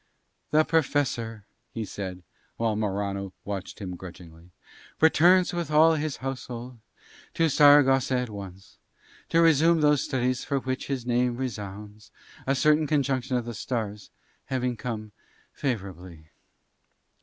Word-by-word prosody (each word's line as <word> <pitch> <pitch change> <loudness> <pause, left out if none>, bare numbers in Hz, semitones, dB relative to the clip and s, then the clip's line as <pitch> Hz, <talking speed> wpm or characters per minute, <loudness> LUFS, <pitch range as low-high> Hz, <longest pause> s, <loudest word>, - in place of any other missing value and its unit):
"The 155 +1 +4
Professor," 130 -9 0 0.2
he 115 -2 -5
said, 95 -2 -6 0.3
while 115 -2 0
Morano 100 -2 -2
watched 100 -2 -5
him 90 -3 -6
grudgingly, 85 -2 -12 0.5
"returns 175 +3 +5
with 170 -3 -3
all 155 +2 +5
his 155 -2 -2
household 125 -2 -6 0.6
to 165 -1 +2
Saragossa 135 -3 +5
at 125 -3 -3
once, 95 -2 -10 0.5
to 165 - +3
resume 165 +1 +4
those 150 -2 +4
studies 130 -1 -1
for 140 - -1
which 130 -1 -3
his 135 -4 -3
name 120 0 +1
resounds, 105 -3 -7 0.4
a 135 - +2
certain 150 +2 +3
conjunction 135 -3 0
of 120 - -3
the 120 - -5
stars 105 -2 -4 0.4
having 125 -2 -1
come 110 -2 -5 0.4
favourably." 90 - -5
125 Hz, 125 wpm, -26 LUFS, 105-145 Hz, 0.6 s, returns